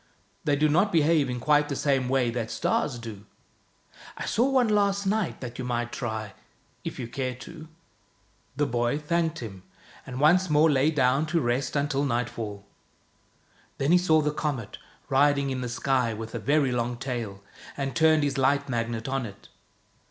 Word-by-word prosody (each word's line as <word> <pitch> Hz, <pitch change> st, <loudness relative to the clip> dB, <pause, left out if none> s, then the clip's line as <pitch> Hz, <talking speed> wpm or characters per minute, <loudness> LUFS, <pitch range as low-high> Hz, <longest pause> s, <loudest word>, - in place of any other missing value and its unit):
They 145 Hz, -, +3 dB
do 150 Hz, +2 st, +3 dB
not 180 Hz, +7 st, +3 dB
behave 155 Hz, -3 st, +3 dB
in 125 Hz, 0 st, -3 dB
quite 150 Hz, +3 st, +3 dB
the 140 Hz, -, -2 dB
same 135 Hz, -3 st, +1 dB
way 130 Hz, -3 st, +2 dB
that 115 Hz, -2 st, -3 dB
the -, -, -9 dB
stars 135 Hz, -4 st, 0 dB
do. 110 Hz, -3 st, -9 dB, 0.9 s
I -, -, -4 dB
saw 245 Hz, +5 st, +2 dB
one 260 Hz, -3 st, +3 dB
last 200 Hz, -1 st, +2 dB
night 205 Hz, -1 st, -1 dB
that 120 Hz, -1 st, -7 dB
you -, -, -2 dB
might 120 Hz, -1 st, -2 dB
try 110 Hz, -4 st, -4 dB, 0.5 s
if -, -, -5 dB
you 120 Hz, -, -4 dB
care 130 Hz, +1 st, -3 dB
to." 155 Hz, +6 st, -11 dB, 0.9 s
The 145 Hz, +2 st, +1 dB
boy 120 Hz, +1 st, 0 dB
thanked 165 Hz, 0 st, -1 dB
him, 95 Hz, -4 st, -8 dB, 0.5 s
and 130 Hz, 0 st, -5 dB
once 175 Hz, +5 st, +4 dB
more 150 Hz, +1 st, +5 dB
lay 140 Hz, +2 st, +3 dB
down 140 Hz, 0 st, +2 dB
to 165 Hz, +2 st, +1 dB
rest 125 Hz, 0 st, -1 dB
until 140 Hz, -1 st, 0 dB
nightfall. 115 Hz, -5 st, -3 dB, 1.1 s
Then 140 Hz, +3 st, +1 dB
he 180 Hz, -, +6 dB
saw 160 Hz, -3 st, +3 dB
the 150 Hz, 0 st, 0 dB
comet, 135 Hz, -9 st, -3 dB, 0.3 s
riding 140 Hz, 0 st, +3 dB
in 130 Hz, -1 st, -3 dB
the 125 Hz, -, -3 dB
sky 125 Hz, -1 st, 0 dB
with 110 Hz, +1 st, -7 dB
a -, -, -3 dB
very 140 Hz, -2 st, +2 dB
long 120 Hz, 0 st, -1 dB
tail, 115 Hz, -6 st, -5 dB, 0.3 s
and 135 Hz, -3 st, -3 dB
turned 155 Hz, +2 st, +4 dB
his 140 Hz, -1 st, -1 dB
Light 140 Hz, +2 st, +2 dB
Magnet 115 Hz, -2 st, -2 dB
on 135 Hz, -3 st, -1 dB
it. 100 Hz, -1 st, -14 dB
135 Hz, 180 wpm, -26 LUFS, 120-150 Hz, 1.1 s, he